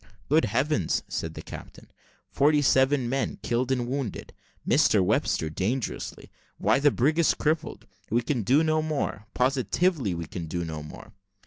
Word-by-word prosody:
"Good 155 Hz, -1 st, +4 dB
heavens!" 115 Hz, -, 0 dB
said -, -, -4 dB
the -, -, -7 dB
captain, -, -, -11 dB, 0.4 s
"forty 145 Hz, +1 st, +3 dB
seven 130 Hz, -1 st, +3 dB
men 135 Hz, +2 st, -1 dB
killed 120 Hz, +2 st, 0 dB
and 125 Hz, -2 st, 0 dB
wounded; 130 Hz, -4 st, -4 dB, 0.3 s
Mr 105 Hz, -, +4 dB
Webster 80 Hz, -, +1 dB
dangerously. 105 Hz, +10 st, -3 dB, 0.3 s
Why, -, -, +2 dB
the 145 Hz, +1 st, +5 dB
brig 145 Hz, +5 st, +1 dB
is 170 Hz, -, +3 dB
crippled. 155 Hz, +1 st, -2 dB, 0.2 s
We 120 Hz, +3 st, +1 dB
can 125 Hz, -1 st, -1 dB
do 135 Hz, +9 st, +3 dB
no 155 Hz, 0 st, +2 dB
more 150 Hz, -9 st, -3 dB
positively, 130 Hz, -, +1 dB
we 85 Hz, 0 st, -4 dB
can 85 Hz, +1 st, -6 dB
do 85 Hz, +2 st, -3 dB
no 80 Hz, -2 st, -5 dB
more." 75 Hz, +8 st, -11 dB
130 Hz, 155 wpm, -26 LUFS, 105-145 Hz, 0.4 s, the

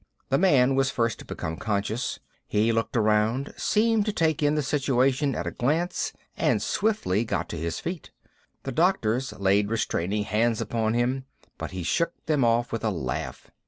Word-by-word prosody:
The 135 Hz, -, +3 dB
man 135 Hz, -8 st, +4 dB
was 135 Hz, 0 st, +2 dB
first 115 Hz, -4 st, 0 dB
to -, -, -10 dB
become 80 Hz, 0 st, -5 dB
conscious. 105 Hz, +3 st, -2 dB, 0.3 s
He 110 Hz, +2 st, +2 dB
looked 115 Hz, +1 st, -1 dB
around, 110 Hz, +5 st, +1 dB
seemed 220 Hz, 0 st, +2 dB
to -, -, +2 dB
take 160 Hz, -7 st, +1 dB
in 145 Hz, 0 st, +3 dB
the 150 Hz, -, +1 dB
situation 135 Hz, 0 st, +1 dB
at -, -, -3 dB
a -, -, -2 dB
glance, 160 Hz, +8 st, 0 dB, 0.2 s
and -, -, +2 dB
swiftly 205 Hz, -, 0 dB
got 115 Hz, -, -2 dB
to -, -, -4 dB
his 85 Hz, 0 st, -3 dB
feet. 175 Hz, -1 st, -5 dB, 0.5 s
The 135 Hz, -, -4 dB
doctors 135 Hz, -, +1 dB
laid 100 Hz, +1 st, +2 dB
restraining 105 Hz, -2 st, -1 dB
hands 110 Hz, +2 st, +1 dB
upon 115 Hz, -1 st, -1 dB
him, 130 Hz, +2 st, 0 dB, 0.3 s
but -, -, -4 dB
he 95 Hz, -1 st, -5 dB
shook 170 Hz, -, 0 dB
them 150 Hz, -4 st, +2 dB
off 120 Hz, +1 st, +2 dB
with 115 Hz, -, -3 dB
a 110 Hz, -, +2 dB
laugh. 65 Hz, -11 st, -4 dB
120 Hz, 175 wpm, -26 LUFS, 105-145 Hz, 0.5 s, man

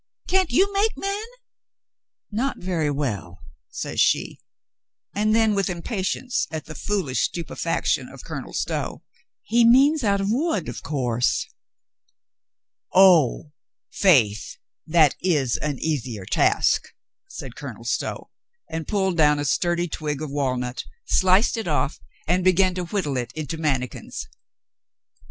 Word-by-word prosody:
"Can't 375 Hz, -2 st, +2 dB
you 390 Hz, +10 st, +3 dB
make 410 Hz, +3 st, +1 dB
men 395 Hz, +2 st, -2 dB, 0.6 s
?" -, -, -68 dB, 0.3 s
"Not 250 Hz, +6 st, -1 dB
very 175 Hz, -5 st, -1 dB
well," 110 Hz, -, -3 dB, 0.3 s
says -, -, -5 dB
she, -, -, +2 dB, 0.7 s
and 215 Hz, +1 st, +2 dB
then, 225 Hz, -1 st, +3 dB
with 195 Hz, -2 st, +1 dB
impa 180 Hz, +4 st, -4 dB
tience 245 Hz, +6 st, -1 dB
at 160 Hz, -2 st, -5 dB
the 155 Hz, -, -8 dB
foolish 155 Hz, -4 st, -1 dB
stupefaction 170 Hz, -1 st, -1 dB
of -, -, -12 dB
Colonel -, -, -7 dB
Stow: -, -, -3 dB, 0.4 s
"He 235 Hz, +1 st, +3 dB
means 270 Hz, +5 st, +5 dB
out 200 Hz, -2 st, +2 dB
of 195 Hz, +1 st, 0 dB
wood, 250 Hz, -, 0 dB
of 120 Hz, -, -6 dB
course." 125 Hz, -5 st, 0 dB, 1.5 s
"Oh! 170 Hz, -6 st, +5 dB, 0.4 s
Faith, 115 Hz, -, +3 dB, 0.3 s
that 155 Hz, -3 st, +5 dB
is 145 Hz, -10 st, +1 dB
an 150 Hz, -3 st, -3 dB
easier 125 Hz, -10 st, -3 dB
task," -, -, +2 dB, 0.4 s
said -, -, -9 dB
Colonel -, -, -8 dB
Stow, -, -, -3 dB, 0.4 s
and 160 Hz, -1 st, -5 dB
pulled 190 Hz, -4 st, 0 dB
down 150 Hz, -2 st, +5 dB
a 145 Hz, -, -2 dB
sturdy 175 Hz, +4 st, +1 dB
twig 150 Hz, -3 st, -3 dB
of 155 Hz, -2 st, -5 dB
walnut, 125 Hz, -3 st, -2 dB, 0.2 s
sliced 190 Hz, +6 st, +3 dB
it 220 Hz, -5 st, -3 dB
off, 150 Hz, -2 st, 0 dB, 0.3 s
and 180 Hz, +2 st, +2 dB
began 185 Hz, 0 st, +4 dB
to 180 Hz, 0 st, -3 dB
whittle 170 Hz, -8 st, -2 dB
it 120 Hz, -1 st, -3 dB
into 155 Hz, +1 st, -4 dB
mannikins. 135 Hz, -, -3 dB
170 Hz, 135 wpm, -23 LUFS, 145-205 Hz, 1.5 s, means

